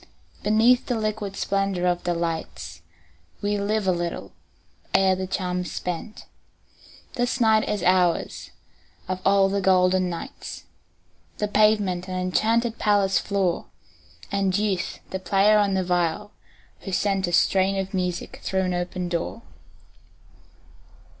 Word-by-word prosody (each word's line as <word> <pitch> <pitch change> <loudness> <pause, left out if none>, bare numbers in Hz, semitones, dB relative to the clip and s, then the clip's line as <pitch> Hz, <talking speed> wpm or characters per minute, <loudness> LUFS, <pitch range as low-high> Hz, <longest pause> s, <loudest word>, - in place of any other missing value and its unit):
Beneath 225 +4 +3
the 245 - 0
liquid 215 -2 -3
splendor 195 -3 -1
of 175 0 0
the 175 -1 0
lights 160 - -4 0.6
We 205 0 -1
live 210 +1 0
a 185 - +3
little 175 -1 -3 0.6
ere 190 -1 +4
the 185 0 -4
charm 180 -1 -2
is 180 - -4
spent; 180 +5 -5 0.9
This 245 +1 -1
night 220 -2 +3
is 210 - -1
ours, 180 -2 +1 0.6
of 185 0 -3
all 195 0 +4
the 200 +1 -1
golden 185 -1 +3
nights, 180 +11 -7 0.7
The 210 - -1
pavement 205 -4 +2
an 185 - -4
enchanted 220 +6 +1
palace 200 -2 +3
floor, 195 -4 -1 0.6
And 195 -1 +1
Youth 195 -4 -1
the 190 - -3
player 200 +3 +4
on 200 -2 +2
the 190 - +1
viol, 180 +3 -1 0.5
who 195 - -7
sent 195 0 +1
A - - -2
strain 190 +2 +3
of 195 0 -3
music 180 -2 -3
through 190 0 -1
an 185 -1 -1
open 175 0 -3
door. 175 +6 -3
190 Hz, 135 wpm, -24 LUFS, 180-210 Hz, 0.9 s, ere